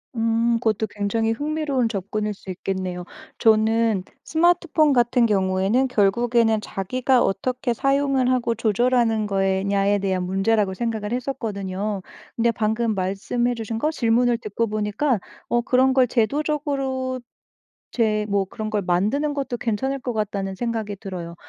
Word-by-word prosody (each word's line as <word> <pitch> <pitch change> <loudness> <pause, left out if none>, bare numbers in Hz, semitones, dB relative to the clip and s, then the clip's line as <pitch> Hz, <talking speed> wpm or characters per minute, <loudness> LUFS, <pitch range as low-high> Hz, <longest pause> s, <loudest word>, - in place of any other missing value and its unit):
음 230 +1 +2
그것도 220 -2 0
굉장히 215 +2 -1
흥미로운 290 -1 -1
접근일 210 0 -3
수 195 - -14
있겠네요. 185 -1 -4 0.3
저는 220 -2 +3 0.2
스마트폰 335 -2 +3
같은 240 -1 +3
경우에는 195 +5 +2
결국에는 230 0 +2
자기가 250 +7 0
어떻게 245 +5 -1
사용을 275 0 +1
하고 235 -2 +1
조절하는 225 0 +2
거에 195 -1 +1
냐에 200 0 +2
대한 190 -2 -1
문제라고 195 +2 +1
생각을 220 +1 -3
했었거든요. 210 -6 -3 0.3
근데 235 0 +2
방금 220 0 0
말씀해 200 +6 -1
주신 225 -1 -4
거 305 +7 0
질문을 240 -3 +2
듣고 230 +1 -2
보니까 215 +4 0 0.3
어 240 - +2
그런 260 +2 +3
걸 260 -1 +4
'제도적으로 270 0 -1 0.7
제 215 -3 +1
뭐 200 -1 +1
그런 215 +3 -5
걸 210 -1 0
만드는 210 +12 0
것도 275 -3 -3
괜찮을 255 +5 -1
것 250 -1 -3
같다.'는 200 -3 -2
생각이 220 -1 -3
들어요. 185 -4 -7
225 Hz, 330 characters per minute, -23 LUFS, 200-250 Hz, 0.7 s, 걸